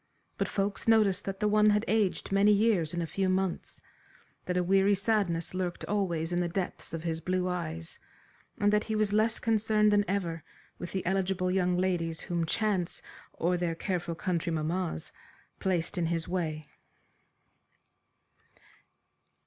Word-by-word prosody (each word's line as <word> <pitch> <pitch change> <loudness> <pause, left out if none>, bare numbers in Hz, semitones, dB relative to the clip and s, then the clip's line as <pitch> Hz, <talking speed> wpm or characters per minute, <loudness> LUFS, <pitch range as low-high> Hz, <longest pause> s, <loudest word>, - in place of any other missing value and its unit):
But - - +1
folks 200 +2 -2
noticed 210 -4 +4
that 195 0 -4
the 210 - +3
one 210 0 +5
had 210 +1 +2
aged 210 -4 0
many 200 +2 +5
years 205 -7 +3
in 175 -1 -2
a - - -1
few 190 +3 -1
months, 185 -1 -1 0.7
that 180 0 -1
a 180 - +2
weary 195 +2 +4
sadness 195 -5 0
lurked 185 -1 -3
always 175 -5 -1
in 175 - +1
the 175 -1 0
depths 180 +1 -4
of 165 -1 -5
his 165 -1 -2
blue 185 +1 0
eyes, 165 -2 -4 0.6
and 205 -1 +2
that 210 - +2
he 220 - -2
was 215 -1 +1
less 215 +1 +3
concerned 215 -1 +2
than 205 0 +4
ever 170 -4 -2 0.4
with 175 - -6
the 190 - -3
eligible 185 0 0
young 180 -1 +1
ladies 175 -3 0
whom 170 -3 -2
chance, 195 -2 0 0.3
or 175 +2 0
their 170 -2 -1
careful 175 -2 -2
country 170 0 -1
mammas, 160 - -2 0.5
placed 180 0 -1
in 170 - +1
his 165 -1 -1
way. 160 -4 -2
185 Hz, 155 wpm, -29 LUFS, 170-205 Hz, 0.7 s, one